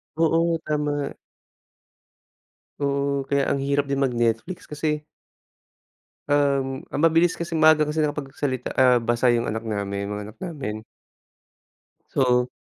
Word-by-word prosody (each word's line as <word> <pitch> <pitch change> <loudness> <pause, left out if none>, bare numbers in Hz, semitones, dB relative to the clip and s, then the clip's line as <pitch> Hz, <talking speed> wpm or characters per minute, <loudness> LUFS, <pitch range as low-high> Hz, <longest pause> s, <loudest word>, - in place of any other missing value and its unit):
Oo, 165 +1 +2
tama. 145 -1 -1 1.7
Oo, 140 0 0
kaya 140 0 +1
ang - - +1
hirap 140 +1 0
din 140 - 0
mag-Netflix 120 +4 -1
kasi 150 0 -1 1.3
um, 140 -2 +1
ang - - -2
mabilis 165 +2 +2
kasi 170 -1 -3
maaga 155 -1 +5
kasi 155 +1 0
nakapagsalita, 140 -3 -3
ah, 125 -2 +5
basa 120 +2 +2
yung 120 0 +1
anak 110 +1 -3
namin 100 -2 -3
yung 100 - -5
mga 105 - -6
anak 110 - -13
namin. 130 -12 -5 1.3
So. 125 -2 +2
140 Hz, 125 wpm, -24 LUFS, 125-150 Hz, 1.7 s, maaga